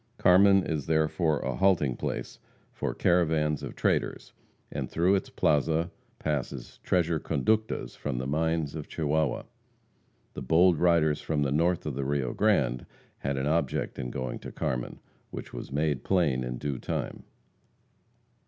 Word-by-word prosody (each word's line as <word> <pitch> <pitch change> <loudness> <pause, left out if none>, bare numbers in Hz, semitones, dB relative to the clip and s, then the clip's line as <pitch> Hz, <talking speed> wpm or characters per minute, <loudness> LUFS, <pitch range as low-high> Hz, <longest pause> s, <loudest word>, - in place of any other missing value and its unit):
Carmen 95 +1 +6
is 75 -3 -3
therefore 80 0 +1
a - - -2
halting 85 -10 +3
place - - -4 0.3
for - - -3
caravans 80 -4 +2
of - - -7
traders, - - -1 0.4
and - - -4
through 90 +4 +2
its 100 - 0
plaza 80 +3 +1 0.3
passes 70 -4 -4
treasure 85 -3 +1
conductas 110 +11 0
from 70 -4 -3
the 65 - -2
mines 80 +1 0
of 75 -2 -6
Chihuahua. 75 -3 0 0.9
The - - -6
bold 85 +5 +4
riders 85 -4 +3
from 75 -2 0
the 70 - 0
north 85 +4 +1
of 75 - -2
the 70 +1 -3
Rio 65 -2 -1
Grande 70 - +1 0.3
had 70 0 -2
an 65 - -1
object 75 -2 0
in 65 -2 -3
going 65 0 -4
to - - -8
Carmen, 60 -1 -3 0.3
which - - -8
was - - -7
made 75 -1 0
plain 75 -9 +2
in 60 0 -4
due 70 -2 -3
time. - - -4
75 Hz, 150 wpm, -28 LUFS, 70-85 Hz, 0.9 s, Carmen